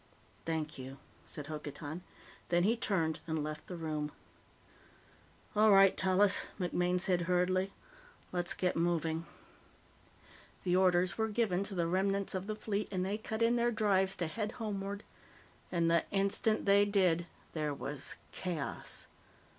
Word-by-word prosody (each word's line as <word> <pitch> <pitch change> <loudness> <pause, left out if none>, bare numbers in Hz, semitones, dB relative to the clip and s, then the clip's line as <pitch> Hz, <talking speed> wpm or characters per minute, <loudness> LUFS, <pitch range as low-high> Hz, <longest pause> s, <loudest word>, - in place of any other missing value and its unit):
"Thank 155 -3 -2
you," 130 +1 -7 0.3
said 145 - -7
Hokotan. 150 +2 -6 0.5
Then 175 0 +3
he 220 +5 +3
turned 165 -8 0
and 160 -2 -1
left 155 0 -5
the 180 - -5
room. 155 -3 -3 1.4
"All 215 +1 +6
right, 195 -1 +7
Tallis," 190 +1 +3
MacMaine 180 0 +1
said 180 -1 +2
hurriedly, 185 +2 +2 0.6
"let's 175 -1 0
get 180 -1 0
moving." 165 -1 0 1.4
The 180 -1 +2
orders 180 0 +3
were 220 - +2
given 210 -4 +1
to 200 - -3
the 170 -2 +1
remnants 195 +3 +1
of 190 +1 -3
the 215 - -2
Fleet, 210 -1 -2
and 185 -2 -1
they 205 +3 -2
cut 220 +1 -2
in 235 +1 +4
their 240 0 +3
drives 195 -4 +2
to 175 - -2
head 215 +6 -3
homeward. 200 -2 -4 0.7
And 170 -2 +2
the 170 -1 +3
instant 200 +2 +1
they 200 0 +6
did, 185 -4 +2 0.3
there 150 -2 -1
was 140 0 -3 0.2
chaos. 170 -6 -2
185 Hz, 145 wpm, -33 LUFS, 165-200 Hz, 1.4 s, right